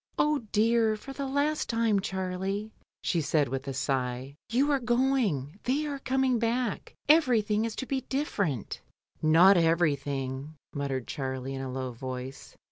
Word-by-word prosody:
"Oh 300 Hz, -1 st, +3 dB
dear! 225 Hz, 0 st, +3 dB
for 270 Hz, +6 st, -9 dB
the 275 Hz, 0 st, -4 dB
last 285 Hz, +3 st, 0 dB
time, 230 Hz, -3 st, +2 dB
Charlie," 190 Hz, +2 st, -3 dB, 0.3 s
she 170 Hz, -, +1 dB
said, 150 Hz, -1 st, +2 dB
with 135 Hz, +2 st, -4 dB
a 135 Hz, -, -2 dB
sigh; 130 Hz, 0 st, -2 dB
"you 270 Hz, +6 st, +2 dB
are 280 Hz, -, +3 dB
going, 240 Hz, -, +1 dB
they 280 Hz, +5 st, +1 dB
are 285 Hz, -2 st, -4 dB
coming 265 Hz, -2 st, +1 dB
back; 230 Hz, -1 st, -1 dB
everything 230 Hz, -8 st, +4 dB
is 230 Hz, -, -4 dB
to 260 Hz, -, -4 dB
be 265 Hz, 0 st, -1 dB
different" 200 Hz, -, -2 dB, 0.4 s
"Not 170 Hz, +5 st, +7 dB
everything," 145 Hz, -4 st, 0 dB, 0.2 s
muttered 135 Hz, -4 st, -2 dB
Charlie 130 Hz, -1 st, -4 dB
in 135 Hz, -, -4 dB
a 130 Hz, -1 st, -4 dB
low 130 Hz, 0 st, -3 dB
voice. 130 Hz, +2 st, -7 dB
195 Hz, 150 wpm, -29 LUFS, -, 0.4 s, Not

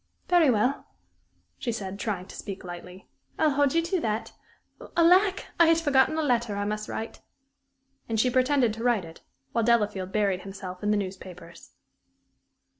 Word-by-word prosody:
"Very 350 Hz, -5 st, +5 dB
well," 245 Hz, +4 st, +1 dB, 0.7 s
she 240 Hz, -, -2 dB
said, 200 Hz, -3 st, -5 dB
trying 195 Hz, -5 st, -3 dB
to -, -, -12 dB
speak 200 Hz, -2 st, -7 dB
lightly. 180 Hz, +1 st, -10 dB, 0.3 s
"I'll 310 Hz, -1 st, +3 dB
hold 285 Hz, +1 st, +2 dB
you 335 Hz, -, +3 dB
to 350 Hz, +2 st, -1 dB
that. 220 Hz, 0 st, -2 dB, 0.6 s
Alack! 365 Hz, +4 st, +4 dB
I 340 Hz, -, +7 dB
had 330 Hz, 0 st, +5 dB
forgotten 290 Hz, -1 st, +3 dB
a 320 Hz, -, +1 dB
letter 235 Hz, -6 st, 0 dB
I 205 Hz, 0 st, -2 dB
must 210 Hz, +1 st, -3 dB
write." 225 Hz, -, -6 dB, 0.9 s
And 225 Hz, -1 st, 0 dB
she 250 Hz, +3 st, +3 dB
pretended 255 Hz, -2 st, +2 dB
to 225 Hz, +1 st, -7 dB
write 235 Hz, -7 st, +2 dB
it, 165 Hz, 0 st, -13 dB, 0.3 s
while 230 Hz, -, 0 dB
Delafield 210 Hz, -5 st, +1 dB
buried 195 Hz, -3 st, +1 dB
himself 190 Hz, -2 st, -8 dB
in 210 Hz, -, -1 dB
the 210 Hz, -, +3 dB
newspapers. 185 Hz, -3 st, -8 dB
220 Hz, 165 wpm, -27 LUFS, 195-275 Hz, 0.9 s, I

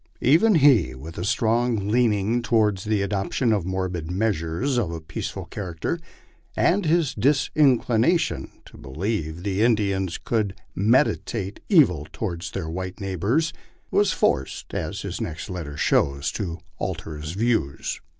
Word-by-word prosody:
Even 170 Hz, -, +5 dB
he, 135 Hz, -, +5 dB
with 80 Hz, +6 st, -9 dB
his 85 Hz, -, -2 dB
strong 115 Hz, -2 st, +1 dB
leaning 110 Hz, 0 st, +2 dB
toward 110 Hz, -4 st, +2 dB
the 105 Hz, 0 st, 0 dB
adop 100 Hz, 0 st, -2 dB
tion 120 Hz, -4 st, +2 dB
of 95 Hz, -4 st, -1 dB
morbid 95 Hz, -3 st, -3 dB
measures 100 Hz, -, 0 dB
of 100 Hz, -8 st, -1 dB
a 85 Hz, -1 st, -4 dB
peaceful 80 Hz, +1 st, -5 dB
character, 95 Hz, -, -4 dB, 0.6 s
and 185 Hz, -1 st, +2 dB
his 160 Hz, -3 st, +2 dB
disinclination 135 Hz, +1 st, +2 dB, 0.2 s
to -, -, -15 dB
be -, -, -11 dB
lieve 85 Hz, +1 st, -3 dB
the 100 Hz, 0 st, -1 dB
Indians 100 Hz, -6 st, +1 dB
could 105 Hz, -5 st, -1 dB, 0.2 s
meditate 110 Hz, -2 st, +1 dB
evil 90 Hz, -, +4 dB
toward 85 Hz, -6 st, -4 dB
their 90 Hz, -5 st, -4 dB
white 90 Hz, +4 st, -5 dB
neighbors, 105 Hz, -, 0 dB, 0.4 s
was 205 Hz, -1 st, +3 dB
forced, 65 Hz, +1 st, -1 dB
as -, -, -3 dB
his -, -, -4 dB
next 80 Hz, +5 st, -5 dB
letter 80 Hz, -6 st, -6 dB
shows, 70 Hz, 0 st, +1 dB
to 85 Hz, -6 st, -4 dB, 0.2 s
alter 80 Hz, -, -4 dB
his 75 Hz, +2 st, -5 dB
views. 110 Hz, -, -1 dB
100 Hz, 140 wpm, -24 LUFS, 85-120 Hz, 0.6 s, Even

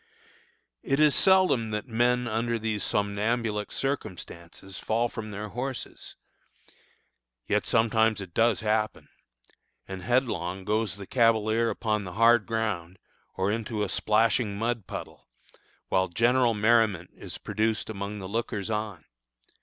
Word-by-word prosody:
It 135 Hz, +1 st, 0 dB
is 150 Hz, -2 st, +5 dB
seldom 185 Hz, -, +4 dB
that 105 Hz, +3 st, -3 dB
men 120 Hz, +1 st, +1 dB
under 115 Hz, +1 st, 0 dB
these 110 Hz, -2 st, -2 dB
somnambulic 105 Hz, +1 st, -1 dB
circumstances 95 Hz, -8 st, -5 dB
fall 115 Hz, +2 st, 0 dB
from 115 Hz, -2 st, -6 dB
their 105 Hz, +1 st, -6 dB
horses, 125 Hz, +4 st, -5 dB, 1.3 s
yet 105 Hz, 0 st, 0 dB
sometimes 110 Hz, -1 st, +3 dB
it 95 Hz, -4 st, -8 dB
does 115 Hz, +1 st, +3 dB
happen, 110 Hz, 0 st, -1 dB, 0.8 s
and 95 Hz, -1 st, -6 dB
headlong 95 Hz, -6 st, -1 dB
goes 110 Hz, -1 st, 0 dB
the 100 Hz, -1 st, -9 dB
cavalier 115 Hz, 0 st, +2 dB
upon 105 Hz, 0 st, -1 dB
the 90 Hz, -2 st, -7 dB
hard 115 Hz, 0 st, +4 dB
ground, 100 Hz, -6 st, -2 dB, 0.4 s
or 95 Hz, +2 st, 0 dB
into 110 Hz, -1 st, -2 dB
a 100 Hz, -, -2 dB
splashing 110 Hz, -1 st, +2 dB
mud 115 Hz, -2 st, -2 dB
puddle, -, -, -8 dB, 0.6 s
while 95 Hz, 0 st, +2 dB
general 120 Hz, +4 st, +3 dB
merriment 105 Hz, -5 st, +2 dB
is -, -, -8 dB
produced 110 Hz, 0 st, -1 dB
among 105 Hz, -1 st, -5 dB
the 95 Hz, -2 st, -6 dB
lookers 110 Hz, 0 st, -3 dB
on. 105 Hz, -5 st, -3 dB
110 Hz, 130 wpm, -27 LUFS, 100-115 Hz, 1.3 s, is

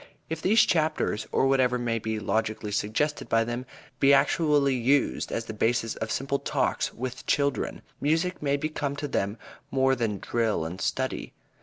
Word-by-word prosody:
If 160 Hz, 0 st, -3 dB
these 215 Hz, +4 st, +5 dB
chapters, 155 Hz, -, 0 dB
or -, -, +2 dB
whatever 130 Hz, -2 st, +3 dB
may 120 Hz, -2 st, -1 dB
be 110 Hz, 0 st, -3 dB
logically 110 Hz, +1 st, -1 dB
suggested 110 Hz, +9 st, -1 dB
by 115 Hz, 0 st, +3 dB
them, 120 Hz, +2 st, -4 dB, 0.3 s
be 140 Hz, 0 st, +6 dB
actually 145 Hz, 0 st, +3 dB
used 130 Hz, +3 st, +1 dB
as 115 Hz, -, -2 dB
the 110 Hz, -, -6 dB
basis 115 Hz, +1 st, +1 dB
of 110 Hz, -, -3 dB
simple 140 Hz, +4 st, -1 dB
Talks -, -, 0 dB
with 130 Hz, +1 st, -6 dB
children, 140 Hz, -1 st, 0 dB, 0.2 s
music 165 Hz, +5 st, 0 dB
may 140 Hz, -1 st, +1 dB
become 145 Hz, -1 st, -2 dB
to 145 Hz, 0 st, -4 dB
them 100 Hz, -4 st, -1 dB, 0.3 s
more 135 Hz, 0 st, +3 dB
than 115 Hz, -4 st, -1 dB
drill 110 Hz, -6 st, 0 dB
and 90 Hz, +4 st, -6 dB
study. -, -, -2 dB
130 Hz, 165 wpm, -27 LUFS, 110-145 Hz, 0.3 s, be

